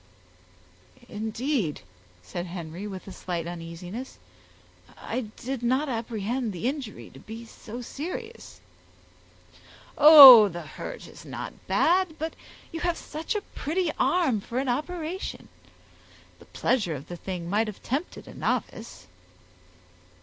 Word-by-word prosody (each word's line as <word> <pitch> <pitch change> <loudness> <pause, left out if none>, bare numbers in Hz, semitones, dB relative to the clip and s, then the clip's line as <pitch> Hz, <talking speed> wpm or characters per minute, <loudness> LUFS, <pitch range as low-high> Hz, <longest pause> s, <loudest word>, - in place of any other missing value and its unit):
"Indeed!" 220 - -2 0.4
said 175 - -5
Henry, 175 +2 -6
with 190 -2 -8
a - - -7
slight 175 -2 -4
uneasiness. 175 +8 -7 0.8
"I 250 -3 -4
did 260 0 -5
not 260 +5 +1
apprehend 230 0 -2
the 180 +6 -3
injury 255 - -5
to 135 - -14
be 225 +8 -9
so 230 +1 -9
serious." 365 - -7 1.4
"Oh, 275 -7 +12
the 175 -2 -6
hurt 155 - -8
is - - -13
not - - -6
bad, 355 -2 +2
but 320 +1 -4 0.4
you 325 - -5
have 345 0 0
such 315 +6 -5
a 420 - 0
pretty 335 +2 -1
arm 270 - +2
for 235 +4 -6
an 265 0 0
operation; 330 +7 -4 0.9
the - - -16
pleasure 200 -11 0
of 140 +1 -9
the 175 - -6
thing 175 -1 -6
might 210 +5 +1
have 210 - -8
tempted 280 +8 -4
a - - -10
novice." 225 - -3
235 Hz, 130 wpm, -26 LUFS, 185-295 Hz, 1.4 s, Oh